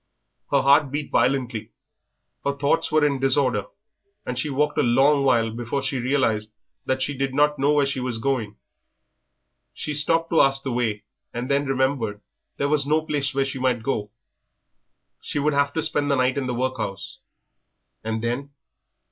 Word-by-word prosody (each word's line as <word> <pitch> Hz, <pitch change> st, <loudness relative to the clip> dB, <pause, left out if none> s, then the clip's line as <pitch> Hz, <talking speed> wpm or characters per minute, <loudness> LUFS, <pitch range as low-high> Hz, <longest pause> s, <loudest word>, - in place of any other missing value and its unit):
Her 140 Hz, -2 st, +2 dB
heart 140 Hz, +1 st, +5 dB
beat 145 Hz, +2 st, -4 dB
violently, 125 Hz, -4 st, 0 dB, 0.7 s
her 140 Hz, -, 0 dB
thoughts 140 Hz, +4 st, +1 dB
were 155 Hz, -1 st, +4 dB
in 140 Hz, -2 st, +1 dB
disorder, 130 Hz, -5 st, +1 dB, 0.6 s
and 125 Hz, -, -3 dB
she 150 Hz, -, -1 dB
walked 150 Hz, +2 st, 0 dB
a -, -, +5 dB
long 135 Hz, +4 st, +4 dB
while 115 Hz, -4 st, +2 dB
before 120 Hz, +4 st, -3 dB
she 135 Hz, -1 st, -1 dB
realised 115 Hz, -5 st, 0 dB, 0.3 s
that 130 Hz, 0 st, 0 dB
she 145 Hz, -, -2 dB
did 135 Hz, 0 st, -2 dB
not 150 Hz, 0 st, +3 dB
know 145 Hz, +2 st, +3 dB
where 145 Hz, -1 st, +3 dB
she 140 Hz, -1 st, -2 dB
was 125 Hz, -2 st, -2 dB
going. 115 Hz, -4 st, -2 dB, 1.2 s
She 150 Hz, -, -3 dB
stopped 165 Hz, +3 st, +2 dB
to 165 Hz, -, +5 dB
ask 135 Hz, 0 st, +2 dB
the 135 Hz, -, -3 dB
way, 115 Hz, -4 st, -1 dB, 0.3 s
and 125 Hz, +3 st, -3 dB
then 140 Hz, 0 st, +1 dB
remembered 130 Hz, -6 st, 0 dB, 0.4 s
there 140 Hz, -, 0 dB
was 145 Hz, -1 st, +1 dB
no 155 Hz, +1 st, +2 dB
place 145 Hz, -3 st, -1 dB
where 135 Hz, 0 st, +2 dB
she 135 Hz, -1 st, -4 dB
might 125 Hz, -3 st, 0 dB
go. 105 Hz, -5 st, -2 dB, 1.1 s
She -, -, -5 dB
would 145 Hz, +1 st, +1 dB
have 140 Hz, 0 st, +2 dB
to 160 Hz, -, -1 dB
spend 145 Hz, -2 st, 0 dB
the 140 Hz, -, +3 dB
night 130 Hz, 0 st, +2 dB
in 140 Hz, -2 st, -2 dB
the 125 Hz, -, -2 dB
workhouse, 120 Hz, -6 st, -4 dB, 0.8 s
and 110 Hz, 0 st, -3 dB
then? 125 Hz, +4 st, -2 dB
135 Hz, 175 wpm, -23 LUFS, 125-145 Hz, 1.2 s, heart